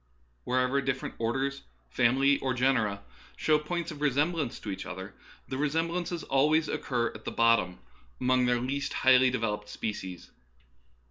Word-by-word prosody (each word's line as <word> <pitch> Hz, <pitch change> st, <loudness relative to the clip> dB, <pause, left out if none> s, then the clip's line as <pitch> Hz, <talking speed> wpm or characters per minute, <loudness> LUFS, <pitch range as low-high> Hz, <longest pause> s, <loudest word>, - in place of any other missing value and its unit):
Wherever 130 Hz, +2 st, +1 dB
different 135 Hz, -1 st, -2 dB
orders, 135 Hz, +4 st, -1 dB, 0.3 s
families, 135 Hz, -, +3 dB
or 130 Hz, -2 st, -1 dB
genera 115 Hz, -6 st, +1 dB, 0.3 s
show 155 Hz, -1 st, +3 dB
points 170 Hz, +2 st, -3 dB
of 150 Hz, -1 st, -9 dB
resemblance 145 Hz, 0 st, 0 dB
to 105 Hz, -, -5 dB
each 95 Hz, -, -5 dB
other, 95 Hz, +2 st, -7 dB, 0.3 s
the 130 Hz, -, -4 dB
resemblances 165 Hz, +3 st, -1 dB
occur -, -, -14 dB
always 150 Hz, +4 st, +3 dB
at -, -, -3 dB, 0.4 s
the -, -, -4 dB
bot 115 Hz, -1 st, +5 dB
tom, 90 Hz, -2 st, -6 dB, 0.4 s
among 125 Hz, 0 st, +2 dB
their 120 Hz, 0 st, +2 dB
least 135 Hz, +3 st, -2 dB
highly 130 Hz, 0 st, +7 dB
developed 105 Hz, -4 st, -2 dB
species. 95 Hz, -5 st, -5 dB
130 Hz, 145 wpm, -29 LUFS, 115-145 Hz, 0.4 s, highly